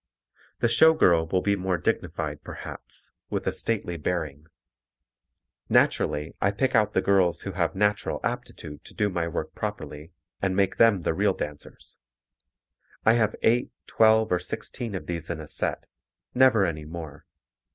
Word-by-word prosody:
The 120 - +4
show 160 +7 +6
girl 85 - +4
will 90 +2 0
be 100 0 +2
more 95 -1 -1
dignified - - -2
perhaps, - - -9 0.2
with - - -3
a - - +1
stately 100 -6 -3
bearing. 75 -2 -3 1.2
Naturally 75 +2 +2
I 100 - +3
pick 130 +6 0
out 105 -1 +3
the 95 - +2
girls 95 -3 +3
who 100 - -5
have 85 -2 -1
natural 105 +1 0
aptitude 75 -1 -5
to - - -14
do 105 -1 +1
my 85 -2 -1
work 85 - -4
properly 75 +4 -6 0.3
and 95 -1 0
make 100 -1 +1
them 115 -5 +5
the 80 - 0
real 100 +2 +1
dancers. 75 0 -8 1.1
I 110 - +6
have 110 -3 +1
eight, 120 +2 +3 0.2
twelve 110 0 +4
or 90 - +3
sixteen 105 +4 -5
of 95 - -5
these 85 -1 -5
in 85 -2 -3
a 80 - -8
set, - - -3 0.5
never 125 -6 +5
any 75 -3 -3
more. 80 -2 -9
95 Hz, 160 wpm, -26 LUFS, 85-105 Hz, 1.2 s, show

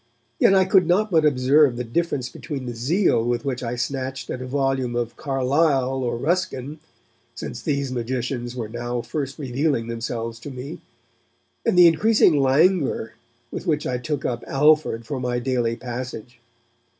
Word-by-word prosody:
Yet 195 - +5
I 190 -1 +5
could 185 -2 +4
not 205 +4 +2
but 160 -3 +4
observe 135 -1 +4
the 125 - -2
difference 130 +1 -1
between 135 0 -6
the 120 - -4
zeal 130 - +2
with 120 +1 -1
which 130 -3 -2
I 120 -1 -3
snatched 130 +1 -4
at 130 - -4
a 130 - -5
volume 135 -2 0
of 120 -1 -2
Carlyle 135 -1 +1
or 120 -1 -1
Ruskin 155 -1 -2 0.6
since 120 0 -6
these 140 -2 -1
magicians 120 0 -3
were 115 -3 -4
now 120 +2 -3
first 140 -3 -4
revealing 135 -2 -1
themselves 115 0 -4
to 130 - -8
me 135 +3 -8 0.9
and - - +2
the 180 - +9
increasing 170 -2 +4
languor 140 -3 +2 0.4
with - - -6
which 150 -2 +1
I 125 -1 -1
took 145 +1 -3
up 120 -1 -2
Alford 150 -5 +3
for 130 +3 -4
my 125 -1 -1
daily 120 -2 0
'passage'. 120 -1 -7
130 Hz, 160 wpm, -23 LUFS, 120-150 Hz, 0.9 s, the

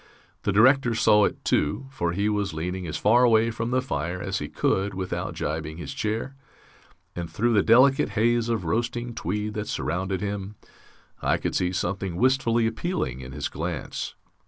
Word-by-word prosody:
The 105 - 0
Director 120 +3 +4
saw 105 -2 +5
it, - - -4
too, 75 - +1
for 95 -11 -1
he 100 +3 0
was 105 -5 -1
leaning 90 +3 -3
as 75 - -3
far 120 +4 +4
away 115 -1 +4
from 115 +1 -3
the 130 +1 +1
fire 85 - -3
as 95 0 -2
he 75 - -5
could 95 +1 0
without 95 -1 -3
jibing 80 +1 -3
his 80 -5 -6
chair, 110 +5 -3 0.8
and 85 -1 -4
through 120 +2 +1
the 105 - +5
delicate 130 +5 +5
haze 120 +1 +2
of 110 -6 -1
roasting 120 +5 -1
tweed 105 +3 -3
that 105 0 -4
surrounded 95 +3 -2
him 100 +1 -4 0.7
I - - +2
could - - -3
see 90 0 +1
something 95 -1 -2
wistfully 120 0 +2
appealing 115 - -2
in 65 0 -8
his - - -3
glance. 80 -1 -4
105 Hz, 175 wpm, -25 LUFS, 90-115 Hz, 0.8 s, saw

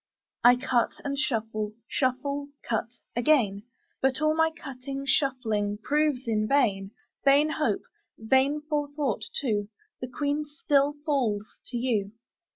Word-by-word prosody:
I 245 +1 +8
cut 245 -1 +1
and 280 0 -1
shuffle; 220 -6 -1
shuffle, 280 +2 -1 0.2
cut, 225 -1 0 0.3
again; 240 -6 +3 0.4
But 265 0 +2
all 310 0 +2
my 320 0 +4
cutting, 275 -3 -7
shuffling, 225 -7 +1
proves 290 +2 +1
in 215 -1 +1
vain: 205 -9 +2 0.3
Vain 285 +3 +5
hope, 300 -10 0 0.3
vain 265 +6 +2
forethought 290 -7 -1
too; 210 -6 -1 0.3
The 255 - -4
Queen 290 +3 -1
still 290 0 +1
falls 235 -9 +1 0.2
to 245 - -4
you. 220 -5 0
265 Hz, 125 wpm, -27 LUFS, 220-285 Hz, 0.4 s, I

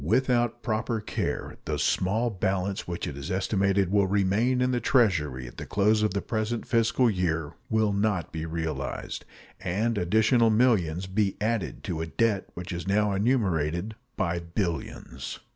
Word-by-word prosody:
Without 120 - +1
proper 110 0 -1
care 105 - -3
the - - -1
small 110 +6 +1
balance 95 +1 -1
which 85 -1 -3
it 70 - -5
is 70 0 -6
estimated 95 0 +1
will 100 -1 +3
remain 105 +6 +2
in 125 0 +2
the 125 - +1
Treasury 80 - +2
at - - -12
the - - -6
close 105 +2 +3
of 105 -2 +1
the 100 - -1
present 110 +1 -2
fiscal 115 +2 +3
year 80 -7 0 0.2
will 110 -2 +2
not 100 -5 0
be 80 -1 -4
realized, 80 -1 -4 0.3
and 105 +5 0
additional 110 +6 +3
millions 105 -7 +2
be 95 +1 0
added 105 - -1
to 80 -3 -3
a 80 - -3
debt 105 +2 +1
which 90 +2 -6
is 85 +1 -5
now 105 +1 +2
enumerated 95 - +1 0.2
by 85 0 0
billions. 85 - -4
100 Hz, 160 wpm, -27 LUFS, 85-110 Hz, 0.3 s, will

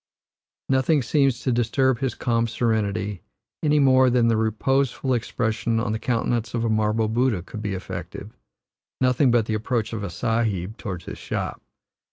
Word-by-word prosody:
Nothing 135 +2 +2
seems 135 -1 +2
to 130 - 0
disturb 120 +2 +1
his 130 -3 -2
calm 115 -2 0
serenity, 105 -4 -1 0.4
any 150 -1 +3
more 130 -2 +5
than 120 -1 +3
the 115 - +3
reposeful 130 +4 0
expression 115 -1 -1
on 115 -1 -1
the 110 - -2
countenance 120 -1 -1
of 115 0 0
a - - +1
marble 110 0 +1
Buddha 115 -4 +1
could 105 +3 -8
be 105 -2 -2
affected 95 +2 -7 0.7
nothing 125 +1 +3
but 120 -2 +3
the 110 - -2
approach 110 +1 -1
of 110 -2 -4
a 100 - -3
Sahib 110 -1 -1
toward 90 -4 -6
his - - -8
shop. - - -4
115 Hz, 165 wpm, -24 LUFS, 110-125 Hz, 0.7 s, more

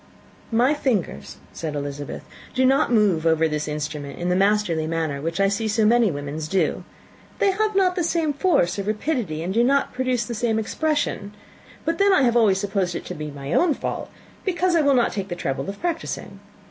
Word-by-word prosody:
"My 245 +5 +3
fingers," 215 - -2 0.2
said 155 -3 -4
Elizabeth, 145 0 -5 0.3
"do 260 0 +3
not 270 +1 +3
move 205 -8 +3
over 160 0 +3
this 150 -1 -3
instrument 150 -2 -4
in 175 +1 -2
the 180 - +2
masterly 195 -5 +2
manner 160 -4 -2
which 165 +4 -3
I 195 - +4
see 205 +3 -1
so 215 +1 +2
many 235 0 +4
women's 145 0 -4
do. 190 +4 0 0.5
They 395 - +3
have 425 +1 0
not 370 -2 +3
the 355 - 0
same 320 -2 0
force 280 - +1
or - - +1
rapidity, 210 - -2
and 185 +2 -2
do 230 +3 +3
not 275 +3 +2
produce 255 -2 0
the 240 - -5
same 225 -1 0
expression. 220 -4 -1 0.5
But 330 +3 -1
then 400 0 +5
I 370 - +4
have 240 -2 +3
always 215 -5 +4
supposed 195 -3 -1
it - - -5
to - - -5
be 155 -2 -6
my 140 +1 -6
own 335 -5 +3
fault - - -4 0.3
because 360 -1 +1
I 330 - +4
would 280 -2 +4
not 240 -2 +3
take 195 -2 -4
the 175 - -4
trouble 140 +1 -3
of 200 - -7
practising. 335 -1 -4
210 Hz, 205 wpm, -23 LUFS, -, 0.5 s, then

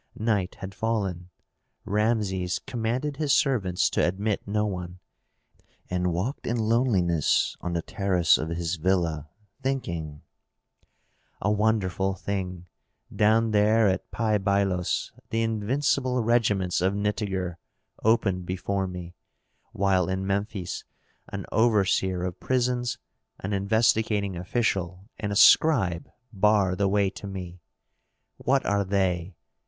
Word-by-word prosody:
Night 105 -4 0
had 95 0 -8
fallen. 100 -6 -2 0.6
Rameses 100 -4 0
commanded 125 +5 -3
his 150 -2 0
servants 100 -11 +2
to - - +1
admit 100 +4 -1
no 105 +1 0
one, 90 -3 -5 0.9
and 90 0 0
walked 95 - -3
in 120 - 0
loneliness 110 - +2
on 90 - -3
the 85 -1 -1
terrace 90 -4 +2
of 80 - -3
his 85 +1 -2
villa, 80 -3 0 0.3
thinking, 85 - -3 1.2
"A 100 - +1
wonderful 100 -3 +1
thing! 90 -3 -4 0.5
Down 110 +1 +3
there 105 +1 +4
at 95 - -1
Pi 110 -2 0
Bailos 95 -2 0 0.2
the 115 0 0
invincible 125 +3 0
regiments 105 -7 +1
of 95 +2 +1
Nitager 100 -4 -2 0.5
opened 100 -5 +2
before 95 +1 -2
me, 90 -1 -7 0.6
while 95 -2 +1
in 95 0 -2
Memphis 100 -1 -3 0.4
an 100 -1 -6
overseer 95 -5 +2
of 90 -1 -4
prisons, 125 -1 0 0.4
an 100 +2 -3
investigating 105 -1 +1
official, 90 -1 -1
and 105 -2 -3
a - - -1
scribe 100 - +5 0.2
bar 100 -2 +3
the 100 +1 +1
way 100 -1 +2
to 100 - -9
me. 90 -2 -7 0.8
What 135 +1 +1
are 100 0 +1
they? 95 -2 -1
100 Hz, 120 wpm, -26 LUFS, 90-110 Hz, 1.2 s, scribe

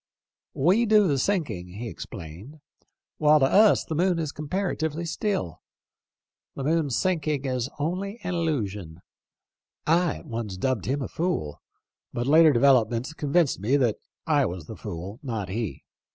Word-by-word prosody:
' - - -67
We 225 +6 +4
do 210 -2 +5
the 140 -4 +1
sinking,' 130 - -1
he 115 +3 -5
explained; 95 - -9 0.3
' - - -54
while 150 0 +5
to 135 - +4
us 210 +9 +5
the - - -4
moon 175 +2 +2
is 155 -3 -2
comparatively 160 0 -2
still. 170 - -2 0.9
The 135 - -4
moon's 150 -3 +1
sinking 155 -6 0
is 130 -1 -1
only 185 +8 -3
an 180 0 -2
illusion.' 105 - -3 0.8
I 170 0 +2
at - - -11
once 115 -5 -5
dubbed 125 -3 -1
him 135 +2 -1
a - - -3
fool, 160 - -3 0.5
but 120 - -2
later 155 +3 +6
developments 125 0 +3
convinced 150 - +1
me 120 +9 +2
that 120 -6 +1 0.3
I 145 -5 +3
was 90 -3 -6
the 110 - -8
fool, 100 +2 -7
not 110 -8 -4
he. 110 0 -4
140 Hz, 155 wpm, -26 LUFS, 110-165 Hz, 0.9 s, later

